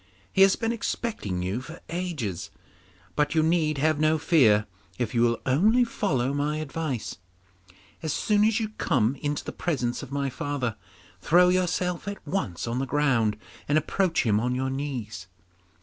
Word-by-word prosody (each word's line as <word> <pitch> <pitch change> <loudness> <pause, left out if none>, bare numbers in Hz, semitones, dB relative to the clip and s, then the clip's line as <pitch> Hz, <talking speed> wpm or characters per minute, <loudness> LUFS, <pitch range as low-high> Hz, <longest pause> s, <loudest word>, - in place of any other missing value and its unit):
He 195 - +3
has 195 0 +7
been 225 -1 -1
expecting 210 - -3
you 95 +7 -2
for 155 +6 -10
ages, 160 - -3 0.7
but 150 +2 +1
you 160 - +4
need 160 -2 +2
have 155 +1 +2
no 155 +1 +3
fear 115 -10 +4 0.3
if 115 -3 -2
you 120 - +2
will 115 -1 +2
only 210 - +4
follow 140 - -1
my 145 +2 -1
advice. 155 -4 -4 0.8
As 160 - -2
soon 210 +6 +2
as 220 +1 +3
you 220 -2 -2
come 130 -5 +2
into 145 +1 -2
the - - -5
presence 125 -8 -2
of 135 -2 -9
my 140 -1 -1
father, 130 -5 -2 0.4
throw 180 +3 +5
yourself 180 0 0
at 200 0 -6
once 95 - -2
on 120 +2 -2
the 135 - -2
ground 125 -8 +2 0.3
and 145 - +3
approach 170 +3 +1
him 105 -2 +3
on 125 +2 0
your 130 +1 -1
knees. 125 -9 -5
145 Hz, 165 wpm, -26 LUFS, 120-175 Hz, 0.8 s, has